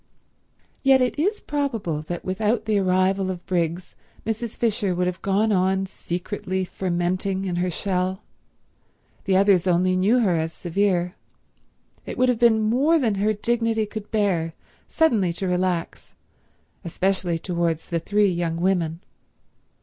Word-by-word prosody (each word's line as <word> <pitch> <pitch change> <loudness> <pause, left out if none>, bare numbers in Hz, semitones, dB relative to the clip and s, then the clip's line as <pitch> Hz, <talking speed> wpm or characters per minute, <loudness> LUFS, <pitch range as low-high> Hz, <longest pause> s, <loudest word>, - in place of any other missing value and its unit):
Yet 270 -1 +5
it 255 +3 0
is 405 +7 0
probable 230 - -2
that 175 +3 -6
without 215 +4 0
the 215 -2 +2
arrival 190 +1 +1
of 180 -2 -5
Briggs 175 0 -2 0.3
Mrs. 225 0 -3
Fisher 210 -5 0
would 180 +1 0
have 180 0 -3
gone 205 +3 +1
on 190 0 +2
secretly 185 +1 -4
fermenting 185 +2 -2
in 180 -2 -2
her 180 +1 0
shell. 185 +2 -2 1.0
The 190 -2 +3
others 195 -2 +4
only 185 +1 +3
knew 200 +7 +3
her 195 -6 +2
as 160 0 -1
severe. 180 0 0 0.9
It - - -5
would 255 0 +3
have 245 -3 +1
been 225 -2 +4
more 265 +10 +3
than 240 -8 +1
her 215 +1 +3
dignity 225 +1 0
could 210 0 -8
bear 180 -7 0 0.3
suddenly 225 - +2
to 190 +3 -3
relax—especially 180 0 -3
towards 170 -2 -2
the 170 - -2
three 205 +3 +2
young 170 -1 -2
women. 170 -3 0
190 Hz, 140 wpm, -23 LUFS, 175-215 Hz, 1.0 s, Yet